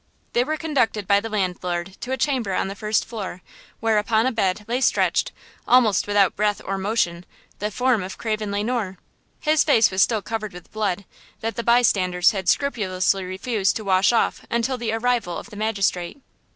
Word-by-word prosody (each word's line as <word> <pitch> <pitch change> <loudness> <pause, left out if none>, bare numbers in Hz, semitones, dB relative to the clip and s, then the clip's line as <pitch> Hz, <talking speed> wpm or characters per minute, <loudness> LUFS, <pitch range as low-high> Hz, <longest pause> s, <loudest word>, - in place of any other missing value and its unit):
They 240 - +3
were 310 +4 -2
conducted 270 -10 0
by 200 0 +5
the 225 +2 -6
landlord 180 -2 -2
to 245 +2 -5
a 265 - 0
chamber 250 -11 0
on - - -1
the 195 - -6
first 210 0 0
floor, 200 -5 -6 0.4
where 220 -1 +3
upon 220 +2 +1
a 260 - +2
bed 210 -2 -1
lay 245 +3 -1
stretched, - - +2 0.4
almost 230 -7 +4
without 205 -2 +3
breath 210 -1 +1
or 195 0 -2
motion, 190 -4 0 0.4
the 210 - -1
form 245 0 +1
of 185 +1 -6
Craven 215 -2 -2
Le 205 +1 -1
Noir. 215 -5 -2 0.4
His 310 -1 +3
face 230 -9 +4
was 190 0 +1
still 220 -2 +2
covered 215 -3 -4
with 180 -1 -12
blood, 200 -3 -2 0.4
that 225 +1 -3
the 235 - -2
bystanders 195 -7 +3
had 190 -4 -2
scrupulously 195 -8 +1
refused 190 +2 -1
to 220 - -4
wash 190 +1 +3
off 235 - +1
until 235 +3 0
the 230 -2 -2
arrival 225 -5 0
of - - -9
the - - -10
magistrate. 200 -2 -1
210 Hz, 190 wpm, -23 LUFS, 190-235 Hz, 0.4 s, by